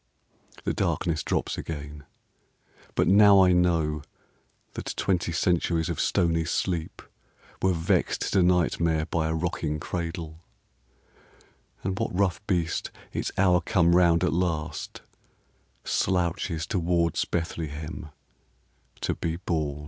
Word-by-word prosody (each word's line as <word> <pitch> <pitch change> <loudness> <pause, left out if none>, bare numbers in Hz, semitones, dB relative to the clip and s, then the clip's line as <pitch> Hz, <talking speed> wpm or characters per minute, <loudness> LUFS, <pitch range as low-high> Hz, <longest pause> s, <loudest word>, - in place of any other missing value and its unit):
The - - -1
darkness 80 -2 0
drops - - -2
again; 75 -2 -7 0.9
but - - +2
now 100 0 +7
I 90 - +5
know 85 -4 +2 0.7
That - - -5
twenty 90 -3 0
centuries 85 -1 +1
of 85 - -3
stony 85 -1 +2
sleep 80 +1 -2 0.6
Were 95 -1 +3
vexed 80 0 0
to 95 - +4
nightmare 85 -3 +2
by 80 -1 -1
a 80 - -1
rocking 80 -2 -2
cradle, 85 -1 -5 1.4
And 95 +1 -2
what 90 - -2
rough 95 -2 +1
beast, 85 -4 0 0.2
its - - -2
hour 90 -2 +4
come 85 -2 +3
round 85 -2 +4
at - - +1
last, 85 -3 -2 0.8
Slouches 85 -2 0
towards 85 -3 +1
Bethlehem 80 -2 -4 0.9
to - - 0
be 80 -1 -3
born? 80 -5 -2
85 Hz, 115 wpm, -26 LUFS, 80-90 Hz, 1.4 s, now